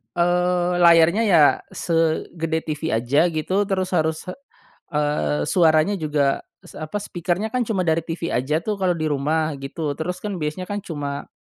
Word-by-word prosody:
eee, 180 +1 +1
layarnya 170 +4 +5
ya 170 -6 +6 0.2
segede 165 0 -1
TV 155 -3 -2
aja 130 +9 +2
gitu 185 +5 -1
terus 185 -2 -1
harus, 160 -2 0 0.7
eee, 145 - 0
suaranya 160 +2 +3
juga 145 -3 +1 0.2
s - - -15
apa 155 +4 -7
speaker-nya 180 +3 -2
kan 250 0 0
cuma 195 -5 0
dari 160 -1 +2
TV 165 0 -4
aja 150 +6 0
tuh 210 0 -3
kalau 180 -2 +1
di 160 - -4
rumah 155 +3 0
gitu 145 +2 -4
terus 180 +3 -3
kan 200 -4 -4
biasanya 155 +4 -3
kan 205 0 -2
cuma, 145 -5 -5
165 Hz, 160 wpm, -22 LUFS, 150-180 Hz, 0.7 s, ya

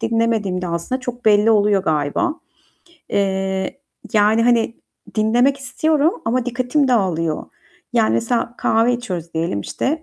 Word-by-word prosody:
dinlemediğim 225 -5 0
de - - -2
aslında 170 +10 -3
çok 245 -1 -6
belli 210 +1 +5
oluyor 205 -2 +3
galiba. 150 - 0 0.7
Eee, 190 +2 -1 0.3
yani, 215 +1 +4
hani, 230 -1 +2 0.4
dinlemek 240 +5 +3
istiyorum 305 +4 0
ama 245 +2 0
dikkatim 255 +3 0
dağılıyor. 170 -9 0 0.5
Yani, 110 - +2
mesela 230 - -1
kahve 225 +2 +2
içiyoruz 180 -9 -5
diyelim 160 -11 -1
işte. 305 - -2
220 Hz, 125 wpm, -19 LUFS, 190-245 Hz, 0.7 s, belli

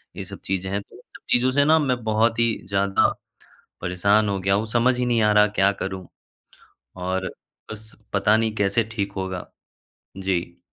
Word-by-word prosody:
ये - - -5
सब - - -8
चीज़ें 95 0 -2
हैं, 100 +1 -1
तो - - -19
इन - - -14 0.2
सब - - -32
चीज़ों 125 +1 +3
से 145 +1 +3
ना 160 +1 +5
मैं 125 -4 0
बहुत 110 +1 +1
ही 115 -1 +3 0.2
ज़्यादा 100 0 +2 0.7
परेशान 100 +4 +2
हो 100 -1 -1
गया 95 +1 +1
हूँ, 105 +3 0
समझ 120 +2 +2
ही 125 - +1
नहीं 120 -2 +2
आ 105 -1 +4
रहा 105 0 +6
क्या 100 +1 +5
करूँ? 95 -1 -5 0.9
और 95 +1 -2 0.4
बस 110 0 -10 0.2
पता 105 +2 +3
नहीं 110 -1 0
कैसे 100 +3 +1
ठीक 100 -3 -3
होगा? 95 -2 -5 0.7
जी। 90 -3 -2
105 Hz, 185 wpm, -23 LUFS, 95-115 Hz, 0.9 s, रहा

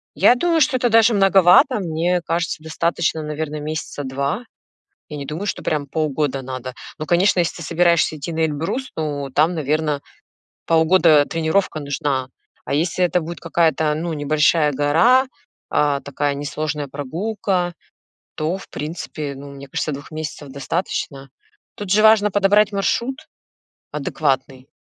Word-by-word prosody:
Я 245 - +5
думаю, 330 +4 +1
что 260 -1 +3
это 245 -1 +1
даже 225 +1 +5
многовато. 195 +4 +5
Мне 175 0 0
кажется, 165 -1 -2
достаточно, 160 0 -1
наверное, 150 0 -4
месяца 150 -1 -5
2. 140 - -2 0.7
Я 150 - -7
не 140 -1 -6
думаю, 170 +7 -5
что - - -3
прям 150 -2 -1
полгода 145 -2 -1
надо. 130 0 -6 0.2
Но, 155 - -5
конечно, 180 +2 +3
если 170 - 0
ты 170 - -7
собираешься 170 0 +2
идти 165 +3 -5
на 160 0 0
Эльбрус, 165 - -3
ну, 145 -3 -3
там, 155 +6 +2
наверно, 150 -1 -1 0.7
полгода 160 -2 +5
тренировка 165 +1 0
нужна. 140 -2 -2 0.4
А - - -3
если 170 +4 +1
это 175 0 +1
будет 170 +2 -7
какая-то, 160 -2 +1
ну, 165 +1 -3
небольшая 150 +1 +2
гора, 165 - +4 0.4
а, 145 -2 +1
такая 140 +1 -2
несложная 145 +1 -3
прогулка, 175 +6 -2 0.6
то, 160 +4 -1
в - - -12
принципе, 150 -2 -5
ну, 140 +1 -10
мне 140 0 -10
кажется, 150 - -2
2 140 0 -7
месяцев 155 -2 -6
достаточно. 140 -1 -4 0.5
Тут 205 -3 -6
же 215 +1 +4
важно 215 -2 +5
подобрать 205 +1 +3
маршрут 235 +6 0 0.8
адекватный. 135 -2 -2
155 Hz, 145 wpm, -20 LUFS, 145-180 Hz, 0.8 s, Я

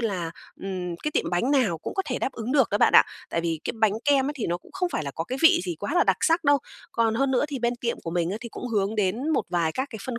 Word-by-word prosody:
là, 185 -8 -2 0.3
ừm, 180 -3 -4
cái 300 - -3
tiệm - - -1
bánh 180 +10 +1
nào 235 - +2
cũng - - -6
có 385 - 0
thể 250 - -2
đáp 265 - -2
ứng 235 +3 -4
được 270 -5 +3
á, 205 - +1
bạn - - +4
ạ. - - +8 0.3
Tại 170 - 0
vì 165 -2 -2
cái - - -2
bánh 215 -2 +4
kem 275 -2 +3
ấy 295 - -1
thì 230 - -2
nó 175 - 0
cũng - - -20
không 370 -1 -1
phải 155 - -2
là 140 - -3
có 165 +4 -4
cái 260 +6 -4
vị 325 - +7
gì 175 -2 -3
quá 290 - -3
là - - +4
đặc - - +3
sắc 330 0 +2
đâu. 285 0 +5 0.3
Còn 225 -1 +1
hơn 270 +3 +1
nữa 260 +2 +2
thì 280 -3 -4
bên 240 0 0
tiệm 235 -1 -2
của 165 - -5
mình 175 0 0
á 205 - -2
thì 235 - -7
cũng 245 - -7
hướng 205 -1 0
đến 215 +8 0
một 310 - +1
vài 170 -3 0
các 260 +2 -2
cái 220 - -7
phân 245 -2 -4
230 Hz, 320 wpm, -25 LUFS, 180-270 Hz, 0.3 s, ạ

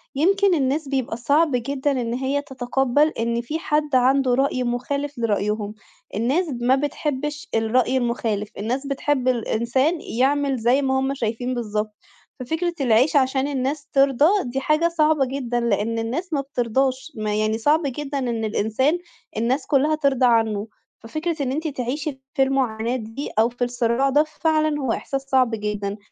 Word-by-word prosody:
يمْكِن 390 +6 +3
الناس 280 +1 0
بيبقى 260 -4 -2
صعب 290 +6 +2
جدًا 275 +3 -1
إن 240 -4 -1
هي 265 +3 -1
تتقبل 265 +1 +1
إن 235 -3 -2
فيه 300 +7 -4
حد 300 -3 0
عنده 260 0 +3
رأي 260 0 +1
مخالف 280 +4 -2
لرأيهم. 210 -1 -1 0.4
الناس 270 +11 +1 0.2
ما 255 +2 +4
بتحبش 290 +1 -3
الرأي 245 +3 +2
المخالف، 230 -4 -1
الناس 250 +7 -2
بتحب 275 -1 0
الإنسان 255 +6 +1
يعمل 275 +2 +1
زَي 245 +4 +2
ما 265 -1 +1
هُم 265 +1 0
شايفين 245 0 -2
بالضبط. 215 -2 -3 0.4
ففكرة 325 +7 -2
العيش 250 +4 +3
عشان 265 0 +2
الناس 280 +1 -2
ترضى 275 0 +4 0.2
دي 255 +2 -3
حاجة 305 +5 +2
صعبة 310 -4 +2
جدًا، 250 -2 -2
لأن 230 0 0
الناس 300 +10 -3
ما 285 - +1
بترضاش، 265 +2 -1
ما 215 -1 -2
يعني 215 +1 +1
صعب 295 +8 +3
جدًا 280 +1 -3
إن 235 -4 -2
الإنسان 220 +9 +1 0.4
الناس 255 +5 0
كُلّها 295 +2 +3
ترضى 275 -4 +2
عنه. 225 -3 +2 0.3
ففكرة 310 +6 -3
إن 255 - -1
أنتِ 315 +4 -2
تعيشي 270 +1 -4
في 270 -3 +3
المعاناة 245 -3 0
دي 225 +3 -5
أو 225 +2 +4
في 245 +1 -4
الصراع 245 +2 +1
ده 290 +3 +4 0.2
فعلًا 310 -2 +2
هو 260 -4 0
إحساس 270 +3 -2
صعب 260 -3 +2
جدًا. 210 -1 -3
265 Hz, 155 wpm, -22 LUFS, 235-285 Hz, 0.4 s, ما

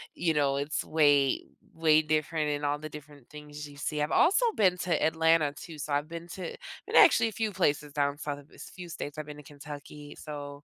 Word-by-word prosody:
you 165 -2 +1
know, 140 -2 +2
it's 145 +2 -2
way 145 -4 +3 0.3
way 155 -1 +4
different 155 0 0
in 145 0 -2
all 145 0 0
the 155 +1 -7
different 145 -3 -12
things 150 0 -9
you 145 - -14
see 150 +1 -2
I've 150 - -1
also 400 +8 +4
been 185 -4 +4
to 175 -1 0
Atlanta 160 -2 +3
too, 160 +2 -10
so 150 0 -4
I've 145 +1 0
been 170 +1 -8
to 185 +1 -6 0.3
and, - - +1
actually 230 - +7
a - - -9
few 220 0 -2
places 150 -6 0
down 145 -1 0
south 145 -1 -4
a - - -14
v 145 - -21
s - - -10
few 180 -1 -9
states, 150 -3 -6
I've 155 - -6
been 150 0 -8
to 150 - -11
Kentucky 145 +1 -10
so, 145 -1 -8
150 Hz, 225 wpm, -29 LUFS, 145-160 Hz, 0.3 s, actually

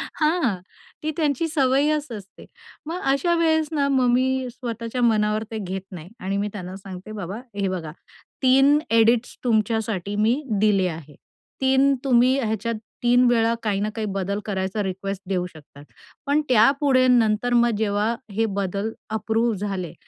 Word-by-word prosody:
हां. 305 - +1 0.4
ती 310 - -1
त्यांची 305 0 0
सवयच 290 0 +1
असते. 200 -3 -10 0.4
मग 340 +4 -4
अशा 310 +6 +1
वेळेस 320 -2 +2
ना, 285 -3 +1
मग 260 -2 +3
मी 260 +1 +1
स्वतःच्या 235 0 -5
मनावर 215 -2 +2
ते 220 - -4
घेत 190 -1 -4
नाही 175 -1 -9
आणि 195 +1 -2
मी 205 - -1
त्यांना 185 -2 -7
सांगते, 195 +1 -9
"बाबा 200 -1 -5 0.2
हे 200 -1 -1
बघा, 170 -4 -4 0.5
3 270 +3 +5
एडिट्स 230 +1 +3
तुमच्यासाठी 220 -4 0
मी 225 +7 +2 0.2
दिले 200 -3 +3
आहे. 155 -3 -9 0.5
3 265 +1 +4
तुम्ही 255 0 +4
ह्याच्यात 225 -1 -2 0.3
3 245 +1 +4
वेळा 230 -1 +3
काही 205 -3 0
ना 210 - 0
काही 220 - -2
बदल 195 +1 -2
करायचा 195 0 -2
रिक्वेस्ट 195 +1 -4
देऊ 180 -2 0
शकतात. 145 -4 -15 0.4
पण 290 +2 +2
त्यापुढे 255 +2 +4
नंतर 240 -1 +3
मग 240 0 +4
जेव्हा 215 +2 0 0.2
हे 225 +3 +1
बदल 200 +3 -2 0.3
अप्रूव्ह 220 +1 0
झाले, 190 -4 -4
225 Hz, 150 wpm, -23 LUFS, 195-260 Hz, 0.5 s, 3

